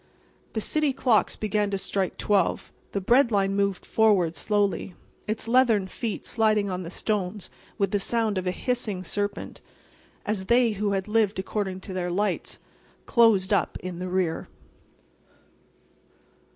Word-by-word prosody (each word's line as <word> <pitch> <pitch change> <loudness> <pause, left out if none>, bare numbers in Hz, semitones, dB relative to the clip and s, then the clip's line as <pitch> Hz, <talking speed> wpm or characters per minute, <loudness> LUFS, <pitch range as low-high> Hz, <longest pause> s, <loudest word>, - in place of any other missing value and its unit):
The 220 - -1
city 300 +3 0
clocks 250 -4 +2
began 210 -1 0
to 200 - -1
strike 190 -1 -2
12; 200 -4 +1 0.2
the 200 - -1
Bread 240 +6 +4
Line 195 -1 +1
moved 200 -2 0
forward 195 -7 +3
slowly, 200 +2 0 0.3
its 215 +1 -2
leathern 230 -5 +4
feet 220 +2 -4
sliding 215 -3 +1
on 180 0 -3
the 170 - -6
stones 200 0 -2 0.3
with 200 -2 0
the 205 - +1
sound 220 -1 0
of 185 - -5
a - - +2
hissing 215 -3 -1
serpent, 205 +3 -4 0.6
as 200 -3 -2
they 235 0 +4
who 205 0 -1
had 190 0 -2
lived 215 -1 +2
according 190 -1 -3
to 190 - -8
their 180 -1 -2
lights 205 +4 -1 0.5
closed 215 -5 +4
up 200 - +1
in 180 -1 -6
the 185 0 -4
rear. 180 -3 -1
205 Hz, 150 wpm, -26 LUFS, 190-220 Hz, 0.6 s, Bread